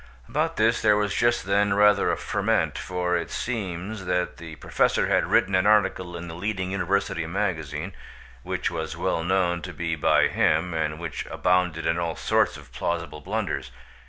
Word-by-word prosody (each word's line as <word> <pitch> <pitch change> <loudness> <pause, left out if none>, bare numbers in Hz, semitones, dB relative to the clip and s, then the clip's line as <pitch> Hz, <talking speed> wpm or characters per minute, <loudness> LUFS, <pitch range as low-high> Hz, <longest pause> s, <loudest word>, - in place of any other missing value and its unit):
About - - -1
this 115 +2 +3
there 105 -1 +4
was 105 -1 0
just 120 -3 +2
then 100 +1 +2
rather 105 0 +4
a - - -1
ferment, - - 0
for 90 +2 -1
it 85 - -2
seems 100 -3 -4
that 90 0 -1
the 80 -2 -9
Professor - - +1
had - - +2
written 95 - +2
an 95 +1 +3
article 95 -4 +2
in 85 +1 -7
the 80 - -7
leading 95 +1 -3
university 95 -3 -1
magazine, 85 -3 -3 0.5
which - - -2
was - - -4
well 80 - -1
known 90 -1 +1
to 90 - -6
be 85 -2 -2
by 75 - +3
him, 80 +3 +1
and 80 -1 -1
which 85 -3 -5
abounded 90 -3 +1
in 80 +1 +1
all 85 -2 -2
sorts - - +1
of - - -15
plausible 85 -3 -3
blunders. 100 +4 -3
90 Hz, 175 wpm, -25 LUFS, 85-100 Hz, 0.5 s, there